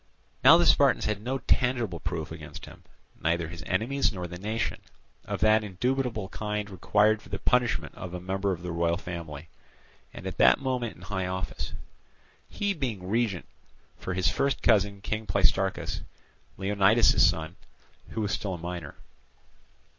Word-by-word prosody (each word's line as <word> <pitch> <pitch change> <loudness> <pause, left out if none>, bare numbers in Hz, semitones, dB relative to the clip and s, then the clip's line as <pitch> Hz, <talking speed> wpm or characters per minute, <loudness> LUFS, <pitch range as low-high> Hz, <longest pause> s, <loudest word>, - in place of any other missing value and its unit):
Now 165 - +9
the 175 - +3
Spartans 140 -4 +4
had 105 -1 -1
no 130 +4 -2
tangible 120 -9 +1
proof 80 -1 -4
against - - -9
him—neither 85 +1 -4
his 85 -1 -8
enemies 120 +9 +1
nor 90 -3 -5
the 90 0 -7
nation—of 110 +2 -5
that 110 0 +5
indubitable 115 +2 -1
kind 105 0 -3
required 105 +4 +2
for - - -16
the 100 - -3
punishment 125 +2 +1
of 90 - -7
a - - -4
member 95 +2 -1
of 90 -2 -4
the 90 - -4
royal 85 0 +1
family, 85 -4 -7 0.6
and - - -10
at - - -5
that - - +7
moment 125 -4 -2
in - - -15
high 95 -2 -2
office; 90 -6 -4 0.8
he 205 -1 -1
being 120 - -4
regent 110 -5 0 0.5
for 90 - -4
his 90 -1 +1
first 140 0 0
cousin 100 -3 +3
King 110 +1 -3
Pleistarchus, 95 -1 +1 0.6
Leonidas's 100 +3 +4
son, 85 -1 +1 0.5
who 110 - -3
was 105 -2 -1
still 95 -3 -2
a - - -6
minor. 85 +1 -6
100 Hz, 155 wpm, -28 LUFS, 90-115 Hz, 0.8 s, Now